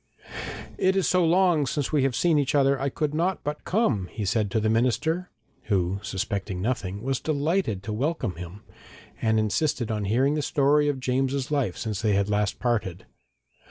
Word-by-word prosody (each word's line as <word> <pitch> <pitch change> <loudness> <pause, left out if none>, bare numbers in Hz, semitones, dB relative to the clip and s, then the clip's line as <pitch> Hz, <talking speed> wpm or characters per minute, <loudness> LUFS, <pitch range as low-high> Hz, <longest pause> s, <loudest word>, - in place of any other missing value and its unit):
'It 190 +1 +3
is 195 - +2
so 180 -1 +3
long 170 -3 +3
since 145 +2 -2
we 150 -3 +2
have 135 -2 +1
seen 160 +3 +3
each 140 0 0
other, 140 -1 +3
I 140 - +1
could 150 +2 -2
not 175 +4 0
but 150 +1 -4
come,' 135 - +1
he 105 +2 -5
said 105 +1 +1
to 110 - 0
the 110 - 0
minister, 130 +10 +1 0.4
who, 95 -2 0
suspecting 95 -1 -3
nothing, 100 -2 -2
was 135 0 -1
delighted 150 - 0
to 105 - -4
welcome 130 - -1
him, 90 +5 -9 0.6
and 110 0 +2
insisted 110 +3 0
on 105 -2 -2
hearing 130 +8 +2
the 150 - 0
story 145 0 +3
of 140 -2 -2
James's 130 +2 -1
life 135 -11 0
since 110 -4 -3
they 110 -2 +2
had 100 +1 +1
last 105 -1 0
parted. 100 -7 -1
130 Hz, 185 wpm, -26 LUFS, 105-150 Hz, 0.6 s, It